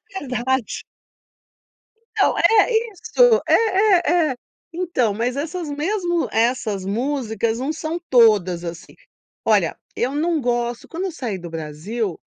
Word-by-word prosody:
É 290 -8 -5
verdade. 250 0 -1 1.3
Então, - - +3
é 450 +2 +4 0.2
isso, 475 +4 +3
é, - - +3 0.6
é, 335 -5 +3
é. - - -4 0.4
Então 330 - 0
mas 240 +4 -1
essas 320 +2 -4
mesmo 345 +3 -1
essas 225 -4 0
músicas 230 0 -1
não 275 +5 -2
são 320 +2 -4
todas 205 -8 +4
assim. 170 0 -8 0.5
Olha, - - +2 0.2
eu 255 +3 -1
não 330 +1 +1
gosto, 240 -1 -2
quando 345 +3 -4
eu 380 - -3
saí 235 - -4
do 175 -1 -8
Brasil, 165 +6 -4
250 Hz, 130 wpm, -21 LUFS, 220-325 Hz, 1.3 s, é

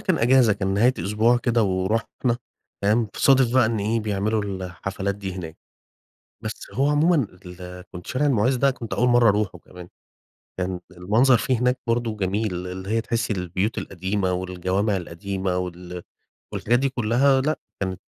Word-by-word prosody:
كان 185 -4 +1
أجازة 120 -1 +5
كان 95 -1 -1
نهاية 120 +5 +4
أسبوع 110 +4 +2
كده 120 -2 +1
ورحنا 105 +5 0 0.5
تمام؟ 105 +2 +2
صادف 130 -3 +4
بقى 130 -3 +5
إن 110 0 -1
إيه 110 +3 0
بيعملوا 105 +1 0
الحفلات 95 +1 -4
دي 95 -2 -5
هناك. 80 -3 -7 0.9
بس - - -2 0.2
هو 135 +2 +2
عمومًا 150 -2 +3 0.2
ال 90 +1 -9
كنت 90 -1 -9
شارع 135 +3 0
المُعز 130 -1 +2
ده 140 +2 +3
كنت 115 -3 -7
أول 125 +1 +2
مرة 120 -1 +5
أروحه 105 -3 +1
كمان. 90 +1 -13 0.7
كان 90 -1 -2
المنظر 110 +8 +3
فيه 125 0 0
هناك 125 +1 +1
برضو 115 -1 0
جميل 100 +1 -1
اللي 95 +1 -6
هي 115 +1 +1
تحسي 115 -1 -1
البيوت 90 +3 -2
القديمة 95 0 -2
والجوامع 95 +3 -1
القديمة 95 +1 -3
وال 90 0 -5 0.5
والحاجات 120 +2 +1
دي 135 +2 +1
كلها 130 +2 +2
لأ، 155 +4 0 0.2
كانت 95 -1 -3
105 Hz, 160 wpm, -24 LUFS, 95-120 Hz, 0.9 s, أجازة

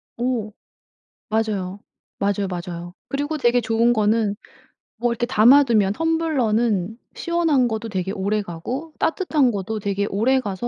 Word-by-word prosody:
어. 235 -3 -2 0.8
맞아요. 205 -3 -1 0.4
맞아요, 200 0 0
맞아요. 175 -1 -6 0.2
그리고 290 +3 -2
되게 240 -2 +3
좋은 230 +2 +2
거는 215 -1 +1 0.6
뭐 240 +2 0
이렇게 240 +1 -1
담아 255 +4 +6
두면 215 -6 +2
텀블러는 240 - 0 0.2
시원한 330 -7 +1
거도 220 0 -4
되게 190 -2 -2
오래가고 210 - -3
따뜻한 315 -7 +2
거도 210 +1 -3
되게 200 0 -1
오래가 220 0 +1
220 Hz, 290 characters per minute, -22 LUFS, 200-255 Hz, 0.8 s, 담아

